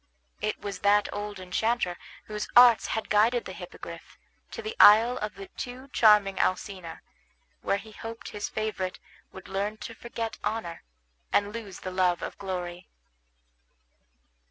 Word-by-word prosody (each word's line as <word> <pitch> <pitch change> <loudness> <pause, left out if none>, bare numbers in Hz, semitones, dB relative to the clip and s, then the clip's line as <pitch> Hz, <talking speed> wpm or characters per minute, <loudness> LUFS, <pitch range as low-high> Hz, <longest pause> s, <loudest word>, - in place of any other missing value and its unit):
It 215 - -1
was 200 -1 -5
that 205 +1 +4
old 205 -1 -5
enchanter 185 +1 0 0.3
whose 210 0 -4
arts 240 -2 +8
had 220 - -2
guided 230 +3 +3
the - - -7
Hippogriff - - -10 0.3
to 460 - -7
the 435 +1 -5
isle 225 +4 +8
of 210 -2 -4
the 195 - -8
too 255 +2 -8
charming 210 -5 +5
Alcina, 185 -3 -2 0.6
where 195 - +1
he 215 +2 -11
hoped 225 +2 -8
his 205 -1 -4
favorite 195 -4 -3 0.3
would 190 - -11
learn 200 +3 -2
to 230 - -7
forget 230 -1 -5
honor, 215 -7 -3 0.5
and 205 0 +2
lose 210 -5 -7
the 185 - -5
love 180 -1 +1
of - - -5
glory. 180 -2 -5
210 Hz, 145 wpm, -28 LUFS, 190-225 Hz, 0.6 s, arts